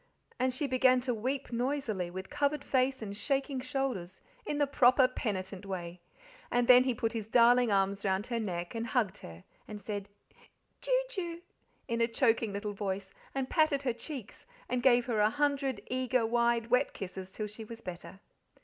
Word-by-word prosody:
And 255 +1 +2
she 290 +4 -2
began 255 -1 +4
to 250 0 -1
weep 255 +4 -3
noisily, 235 -7 -1
with 190 +2 -7
covered 285 0 0
face 260 -2 +1
and 200 -1 -5
shaking 270 +3 -1
shoulders, 255 - -3 0.3
in 295 - -1
the 290 - +3
proper, 260 -2 +5
penitent 195 -6 -4
way. 180 -3 -6 0.5
And 245 0 +1
then 250 0 +8
he 255 -2 +1
put 225 -1 -1
his 220 -3 -4
darling 240 +1 +5
arms 195 0 +1
round 190 +1 0
her 235 -2 -2
neck 175 -5 -3
and 230 0 -3
hugged 225 -5 0
her, 85 +1 -11 0.2
and 210 -1 -7
said 205 0 -5 0.7
"Ju - - +2
Ju" 345 -6 -4 0.5
in 235 -2 -1
a 230 - +4
choking 230 -2 +2
little 205 +1 -4
voice, 195 -1 -4 0.2
and 265 -1 -1
patted 310 -3 +2
her 250 -3 +1
cheeks, 255 -3 -8 0.2
and 250 -1 -1
gave 245 -2 +5
her 230 -4 0
a 210 0 +5
hundred 280 -2 0
eager, 255 -2 0
wide, 235 0 +1
wet 250 +3 +3
kisses 190 0 -7
till 215 - -4
she 210 +2 -8
was 230 +1 -10
better. 180 +2 -8
235 Hz, 180 wpm, -31 LUFS, 200-260 Hz, 0.7 s, then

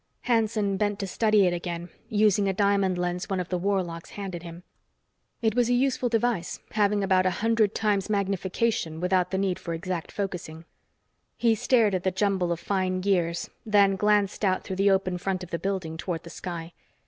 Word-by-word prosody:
Hanson 220 -4 +1
bent 205 0 0
to 200 - -3
study 215 +1 +3
it 175 - +2
again, 175 0 -4 0.2
using 205 -2 +3
a - - +1
diamond 200 -2 +2
lens 180 0 -2
one 190 -1 -1
of 180 - -4
the 180 - 0
warlocks 180 -3 -2
handed 190 -4 -6
him. 170 0 -10 0.8
It 220 -2 +3
was 245 0 +2
a 245 - +3
useful 255 -1 +1
device, 225 -6 0
having 205 -1 +2
about 185 -1 +3
a 185 - -1
hundred 225 -2 +2
times 205 -2 0
magnification 195 -3 -1
without 180 0 +1
the 190 - -1
need 190 -2 0
for 170 -1 -4
exact 175 0 -4
focusing. 175 -5 -5 0.7
He 230 -1 +3
stared 225 -2 +3
at 185 - 0
the 190 - +2
jumble 190 -2 0
of 170 - -1
fine 185 -1 -1
gears, 175 -3 0
then 200 -2 +4
glanced 205 0 +1
out 185 -2 +2
through 190 - -5
the 200 +1 +4
open 190 -2 +1
front: 185 0 -2
of 180 - -10
the 170 - -2
building 185 -5 -3
toward 165 0 -4
the 170 - -10
sky. 170 -1 -6
190 Hz, 190 wpm, -26 LUFS, 180-205 Hz, 0.8 s, then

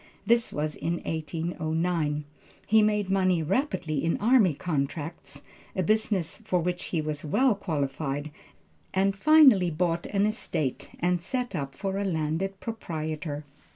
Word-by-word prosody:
This 235 +2 +3
was 150 0 -2
in 170 - -2
1809. 160 -1 -1 0.4
He 220 +1 +5
made 210 -2 +1
money 185 -3 +2
rapidly 170 - -1
in 165 - +1
army 215 - +4
contracts, 145 -1 -4 0.3
a 185 - +1
business 205 -4 +1
for 210 -5 -1
which 175 +1 -2
he 170 - -1
was 150 -1 -4
well 245 - +3
qualified, 145 -5 -3 0.6
and 195 +1 +2
finally 265 - +6
bought 170 +1 -1
an 200 0 +1
estate 160 - -2
and 175 0 +1
set 250 +6 -2
up 140 -3 -4
for 195 +3 -2
a - - 0
landed 180 +2 -1
proprietor. 155 -8 -4
175 Hz, 135 wpm, -27 LUFS, 155-200 Hz, 0.6 s, finally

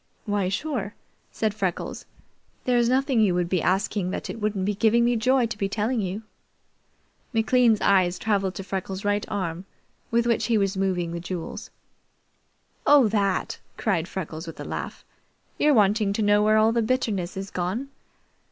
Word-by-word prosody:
"Why, 205 -3 0
sure," 215 -2 -3 0.4
said 215 -2 -1
Freckles. 190 -4 -3 0.6
"There's 240 -2 +3
nothing 265 -1 +2
you 195 -5 +3
would 175 -1 0
be 185 -3 +1
asking 190 +1 0
that - - -4
it 225 - -9
wouldn't 205 -3 -1
be 210 - +1
giving 225 +3 +3
me 240 0 +2
joy 250 +2 +3
to 230 -2 -5
be 195 - 0
telling 220 +3 0
you." 195 +3 -4 1.1
McLean's 225 0 +3
eyes 185 -2 +3
traveled 195 -3 0
to 195 - -5
Freckles' 190 0 -4
right 205 0 +1
arm 180 -3 -3 0.4
with 235 0 +2
which 235 -1 +1
he 230 -2 +3
was 195 -1 0
moving 185 -3 -1
the 170 - -4
jewels. 170 -1 -6 1.2
"Oh, 285 -5 +7
that!" 200 -3 0 0.2
cried 180 -6 0
Freckles 165 -3 -6
with 165 - -9
a - - -6
laugh. - - -6 0.5
"You're 295 -1 +4
wanting 210 -1 +3
to 215 - -1
know 205 0 +4
where 215 +1 +4
all 220 +1 +4
the 235 0 +1
bitterness 215 -7 -1
is 195 0 -5
gone? 190 +10 -3
205 Hz, 170 wpm, -25 LUFS, 190-230 Hz, 1.2 s, Oh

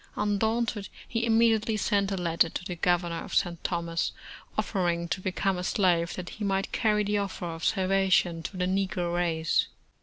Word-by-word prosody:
Undaunted, 210 0 0 0.2
he 230 0 -1
immediately 225 -1 +3
sent 200 -1 +1
a - - 0
letter 170 -1 +2
to 180 - -5
the 180 -2 -4
Governor 175 -1 0
of - - -6
St. 170 -2 0
Thomas, 170 -2 -1 0.4
offering 175 -4 0
to 190 - -2
become 190 0 0
a - - -3
slave 175 -3 +2
that 180 -1 -6
he 215 - -7
might 195 -1 0
carry 210 -2 +2
the 205 0 0
offer 195 -3 -4
of 165 -1 -6
salva 195 0 +2
tion 175 -2 +3
to 185 - -6
the 180 - +1
negro 185 -2 -1
race. 165 -2 +1
185 Hz, 180 wpm, -28 LUFS, 175-205 Hz, 0.4 s, immediately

